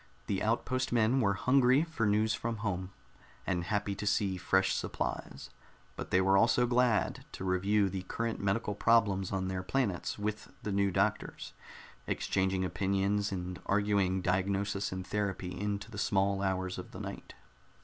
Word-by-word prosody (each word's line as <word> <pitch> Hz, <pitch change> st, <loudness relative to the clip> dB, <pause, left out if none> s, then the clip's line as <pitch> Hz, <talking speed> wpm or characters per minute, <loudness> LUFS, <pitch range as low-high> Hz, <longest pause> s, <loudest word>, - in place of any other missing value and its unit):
The 100 Hz, -2 st, -1 dB
outpost 130 Hz, +4 st, 0 dB
men 120 Hz, +2 st, +3 dB
were 100 Hz, -3 st, +2 dB
hungry 130 Hz, +4 st, +4 dB
for 160 Hz, -10 st, -1 dB
news 110 Hz, +1 st, +2 dB
from 115 Hz, +1 st, -2 dB
home, 95 Hz, -1 st, -2 dB, 0.5 s
and 90 Hz, -3 st, -1 dB
happy 105 Hz, +1 st, -1 dB
to 105 Hz, +2 st, -5 dB
see 100 Hz, -2 st, +1 dB
fresh 95 Hz, +1 st, +2 dB
supplies; -, -, -4 dB, 0.4 s
but -, -, -6 dB
they 95 Hz, -, +3 dB
were 95 Hz, +1 st, +4 dB
also 120 Hz, +2 st, +4 dB
glad 120 Hz, -2 st, +2 dB
to -, -, -6 dB
review 100 Hz, +2 st, +2 dB
the 95 Hz, 0 st, -3 dB
current 115 Hz, +4 st, -3 dB
medical 105 Hz, +2 st, 0 dB
problems 100 Hz, -3 st, +2 dB
on 95 Hz, -1 st, -1 dB
their 95 Hz, 0 st, -2 dB
planets 100 Hz, -2 st, -1 dB
with 105 Hz, +1 st, -4 dB
the 105 Hz, -, -2 dB
new 100 Hz, 0 st, +2 dB
doctors, 90 Hz, -, -1 dB, 0.5 s
exchanging 95 Hz, 0 st, 0 dB
opinions 100 Hz, +2 st, 0 dB
and 90 Hz, -1 st, -5 dB
arguing 100 Hz, -2 st, +1 dB
diagnosis 100 Hz, +2 st, 0 dB
and 95 Hz, -1 st, -4 dB
therapy 100 Hz, -3 st, -2 dB
into 100 Hz, +2 st, -3 dB
the 105 Hz, -, -6 dB
small 100 Hz, -2 st, +1 dB
hours 95 Hz, -1 st, -1 dB
of -, -, -9 dB
the -, -, -7 dB
night. -, -, -7 dB
100 Hz, 160 wpm, -31 LUFS, 95-110 Hz, 0.5 s, hungry